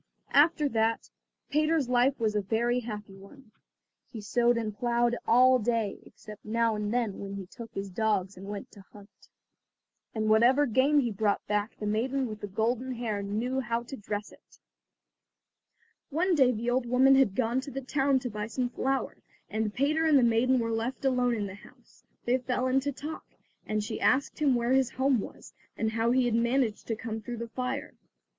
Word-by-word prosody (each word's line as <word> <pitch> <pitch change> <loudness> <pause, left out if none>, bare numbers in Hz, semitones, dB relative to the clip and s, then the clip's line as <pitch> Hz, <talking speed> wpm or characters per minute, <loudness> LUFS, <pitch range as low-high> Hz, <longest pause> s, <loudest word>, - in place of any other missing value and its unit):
After 300 +1 +4
that 225 -1 0 0.4
Peter's 305 -1 +2
life 250 +2 +2
was 220 -2 +1
a 210 - +2
very 235 +5 0
happy 210 -4 -7
one. 215 +5 -16 0.6
He 230 - -8
sowed 235 +3 +2
and 215 -3 -3
ploughed 240 +1 +1
all 255 +2 +6
day, 225 -3 -1
except 210 0 -13
now 230 +1 +1
and 210 0 -3
then 235 -5 -1
when 200 0 -6
he 195 -1 -6
took 230 +5 -11
his 195 0 -4
dogs 200 -1 0
and 190 +2 -10
went 205 -1 -7
to 205 - -14
hunt. 200 -1 -17 0.9
And 215 -1 -1
whatever 240 +6 +5
game 280 +4 +3
he 240 -3 -1
brought 205 0 0
back 210 +1 -2
the 210 - -5
maiden 250 +6 0
with 215 -1 -8
the 205 - -4
golden 235 +6 -1
hair 220 -4 -3
knew 225 +6 -2
how 235 -1 -2
to 255 +3 -8
dress 205 -2 -5
it. - - -21 1.5
One 355 +6 +1
day 265 -6 +5
the 235 +1 -2
old 250 0 0
woman 260 +3 +5
had 265 -8 +4
gone 250 +1 0
to 275 - -8
the 270 - -5
town 270 +1 +1
to 250 - -4
buy 210 0 -4
some 245 +2 -2
flour, 265 +2 -2 0.3
and 215 -1 -1
Peter 295 +7 +1
and 310 -3 +5
the 260 - +4
maiden 235 +3 +3
were 230 -1 -1
left 235 +4 -3
alone 250 -2 +2
in 210 -2 -2
the 190 - -7
house. 245 +5 -18 0.2
They 250 +2 +2
fell 250 0 -2
into 265 +2 +1
talk, 300 +3 -7 0.4
and 215 -1 -1
she 220 +1 -5
asked 270 +4 +1
him 285 -4 +3
where 240 +1 0
his 265 -2 +3
home 260 -1 +1
was, - - -9 0.2
and 220 0 0
how 225 +1 0
he 255 +1 +3
had 240 - 0
managed 235 -1 0
to 225 - -1
come 220 0 -5
through 240 +2 -6
the 230 0 -6
fire. 255 +3 -4
235 Hz, 195 wpm, -28 LUFS, 215-260 Hz, 1.5 s, all